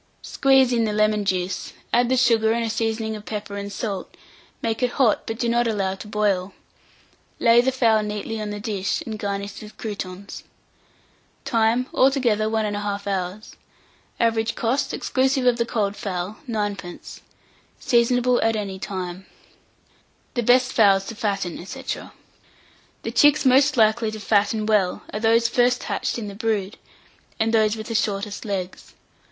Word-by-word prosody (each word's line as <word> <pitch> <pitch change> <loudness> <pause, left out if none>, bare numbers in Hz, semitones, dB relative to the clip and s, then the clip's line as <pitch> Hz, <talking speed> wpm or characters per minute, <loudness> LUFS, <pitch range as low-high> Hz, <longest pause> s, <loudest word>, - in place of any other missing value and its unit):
Squeeze 270 -2 +3
in 230 -1 +2
the 210 - -1
lemon 215 -1 +2
juice, 185 -1 -2 0.2
add 240 0 +3
the 260 - +2
sugar 230 -3 +3
and 235 0 -1
a 225 - -2
seasoning 220 -1 -2
of 210 - -9
pepper 210 -1 -5
and 200 0 -5
salt, 200 -2 -4 0.5
make 225 +1 -1
it 250 -1 +1
hot, 240 -6 +2
but 225 - -3
do 240 - -1
not 235 0 +2
allow 200 -4 0
it 190 - -7
to - - -8
boil; 200 -3 0 0.8
lay 235 0 +5
the 260 +2 +1
fowl 230 -4 +3
neatly 210 +1 -4
on 210 - -4
the 205 0 -5
dish, 200 -2 -2
and 220 -2 -5
garnish 200 0 -4
with 215 0 -12
croûtons. 200 -3 -6 1.0
Time. 230 +1 +2
Altogether 245 -6 +2
1 220 -1 0
1/2 205 -1 -3
hour. 190 +1 -2 0.8
Average 225 -1 +1
cost, 250 +5 0
exclusive 265 0 0
of 245 -1 +4
the 235 -1 0
cold 205 -4 -1
fowl, 200 -1 -4
9d. 205 -5 -4 0.6
Seasonable 245 0 +2
at 225 0 +2
any 195 -3 -4
time. 185 -1 -5 1.1
THE 240 - 0
BEST 250 +2 +3
FOWLS 195 -3 +4
TO 225 - -6
FATTEN, 200 -6 -3
&c. 190 - -8 1.2
The - - -3
chicks 295 0 +4
most 265 +2 +4
likely 220 0 +3
to 215 0 -6
fatten 210 +1 +1
well 210 -4 +1
are 210 - -2
those 230 +1 +3
first 245 +1 +2
hatched - - -2
in 220 -3 -5
the 200 - -7
brood, 210 -1 -2 0.6
and 225 +1 +1
those 215 -1 +3
with 220 -1 -7
the 230 - -5
shortest 205 -1 -1
legs. 190 -3 -5
220 Hz, 160 wpm, -23 LUFS, 200-235 Hz, 1.2 s, lay